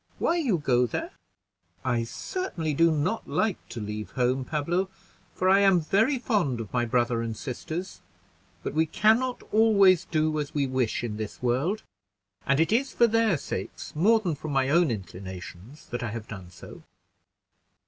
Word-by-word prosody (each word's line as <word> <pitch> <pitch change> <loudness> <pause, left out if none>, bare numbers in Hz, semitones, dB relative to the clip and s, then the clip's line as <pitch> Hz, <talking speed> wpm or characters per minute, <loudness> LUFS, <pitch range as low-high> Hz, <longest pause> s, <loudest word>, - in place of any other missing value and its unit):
Why 340 - +1
you 255 - +1
go 125 -5 +2
there?" - - -4 0.7
"I 120 -2 +1
certainly 165 - -3
do 165 +4 +4
not 160 +8 -1
like 215 -4 0
to 120 - -6
leave 105 0 -5
home, 130 +1 +1
Pablo, 170 +7 -1 0.5
for 185 - 0
I 195 +1 +6
am 195 -3 +5
very 220 - +2
fond 195 - 0
of 110 -3 -7
my 120 -1 +1
brother 120 0 +1
and 115 -1 -4
sisters; 160 +7 -6 0.6
but - - -3
we 160 +1 +2
can 215 +8 +4
not 255 -1 -3
always 200 -5 +5
do 155 -1 0
as 150 0 -5
we 145 -2 +2
wish 130 -3 -1
in 110 -3 -3
this 110 +2 -6
world, 135 - 0 0.6
and 140 +1 +3
it 165 - +2
is 260 +5 +2
for 235 - +5
their 225 -5 +2
sakes, - - -6
more 215 +9 +4
than 180 -6 -2
from 150 +1 -6
my 135 -1 +2
own 170 +1 +4
inclinations, 95 - -8
that 120 - -4
I 120 - -2
have 110 0 -6
done 95 -4 -9
so." 85 - -12
150 Hz, 175 wpm, -27 LUFS, 120-195 Hz, 0.7 s, I